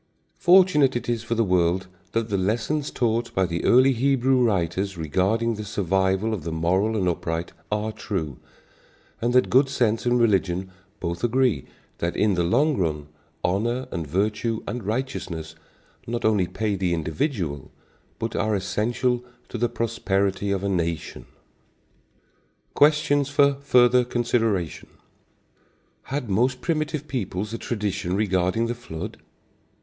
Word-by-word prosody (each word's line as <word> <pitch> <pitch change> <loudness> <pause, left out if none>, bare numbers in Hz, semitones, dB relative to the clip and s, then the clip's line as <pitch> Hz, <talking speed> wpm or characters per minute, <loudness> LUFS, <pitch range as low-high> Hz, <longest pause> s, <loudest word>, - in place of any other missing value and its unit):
Fortunate 175 -7 +5
it 120 - -3
is 120 -2 0
for 120 0 -2
the 115 - +2
world 90 -1 +1 0.3
that 115 0 -1
the 100 - 0
lessons 120 +10 -1
taught 120 -1 0
by 95 - +3
the 85 -1 -3
early 130 +2 +5
Hebrew 130 0 +2
writers 95 -2 0
regarding 95 +9 +1
the 105 -1 -5
survival 95 +1 0
of 95 -8 -4
the 85 - -4
moral 95 +7 +1
and 95 -3 0
upright 85 -1 -2 0.2
are 105 +1 -1
true, 85 - -4 0.8
and 120 +1 +1
that 125 - +3
good 135 +1 +5
sense 120 -4 0
and 120 0 +3
religion 95 -4 +1 0.3
both 85 +2 -4
agree 120 - +2 0.3
that 85 0 -1
in 105 -2 +3
the 90 - +1
long 140 - +2
run, 75 -5 -2 0.3
honor 115 +8 0
and 85 -4 -4
virtue 105 +6 -1
and 120 -4 -5
righteousness 95 -10 -3 0.5
not 120 +1 -2
only 105 -5 +3
pay 105 +3 -2
the 90 -2 0
individual, 80 - -2 0.5
but 115 0 -4
are 110 -1 +1
essential 115 +6 0 0.3
to 120 - -5
the 120 +1 +1
prosperity 100 -4 -1
of 100 -1 -1
a - - 0
nation. 85 -4 -2 1.5
Questions 145 -1 +3
for 140 0 +4
Further 125 -2 +5
Consideration. 115 -7 -1 1.2
Had 135 -2 -3
most 125 +6 +1
primitive 155 -1 -2
peoples 105 -5 -3
a 115 - -4
tradition 100 -5 -2
regarding 95 +1 +1
the 120 - -1
flood? 115 -10 -7
110 Hz, 140 wpm, -24 LUFS, 90-120 Hz, 1.5 s, Fortunate